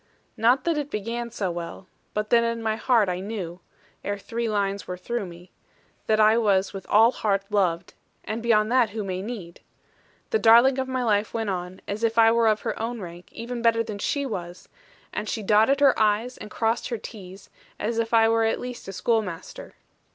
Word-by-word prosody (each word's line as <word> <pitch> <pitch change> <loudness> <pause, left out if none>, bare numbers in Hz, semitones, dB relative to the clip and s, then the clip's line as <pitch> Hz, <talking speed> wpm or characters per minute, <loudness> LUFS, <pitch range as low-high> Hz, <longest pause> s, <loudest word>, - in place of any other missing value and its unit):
Not 245 +3 +3
that 330 -3 0
it 290 -1 -4
began 235 +2 -3
so 195 -5 -2
well; 170 +2 -7 0.3
but 210 0 -2
that 235 -1 +5
in 230 0 -2
my 220 -1 0
heart 230 -2 +2
I 180 0 -2
knew 185 -4 -5 0.4
(ere 205 0 -2
three 230 +3 -3
lines 200 -2 -1
were 180 - -5
through 215 +2 -3
me) 175 +1 -13 0.6
that 215 0 +3
I 215 +2 +5
was 200 -3 +2
with 195 -1 -8
all 225 +3 +6
heart 200 -5 0
loved 180 -5 0 0.3
and 220 +2 -4
beyond 220 -1 +2
that, 250 -3 +4
who 215 +1 -4
may 185 -1 -3
need? 195 -6 -7 0.7
The 445 - +2
darling 250 - +6
of 260 - -1
my 255 -1 -1
life 210 -1 +1
went 225 -3 -1
on, 180 0 -5
as 205 +3 -4
if 230 0 +1
I 225 0 +7
were 230 0 +3
of 215 -1 +2
her - - -3
own 235 +1 -3
rank, 175 -2 -9
or - - -27
even 235 +1 -5
better 230 -1 +3
than 210 -2 -6
she 280 +6 -1
was; 180 -7 -6 0.5
and 215 - -3
she 220 - -3
dotted 220 +8 +3
her 275 -3 +6
'i's,' 220 +4 +1
and - - -8
crossed 225 +2 -1
her 235 - -2
't's,' 195 -3 -11 0.3
as 225 +2 -1
if 230 0 -1
I 225 -1 +5
were 225 0 +2
at 225 - 0
least 250 -4 -7
a 195 - -6
schoolmaster. 200 -5 -3
220 Hz, 210 wpm, -25 LUFS, 195-235 Hz, 0.7 s, I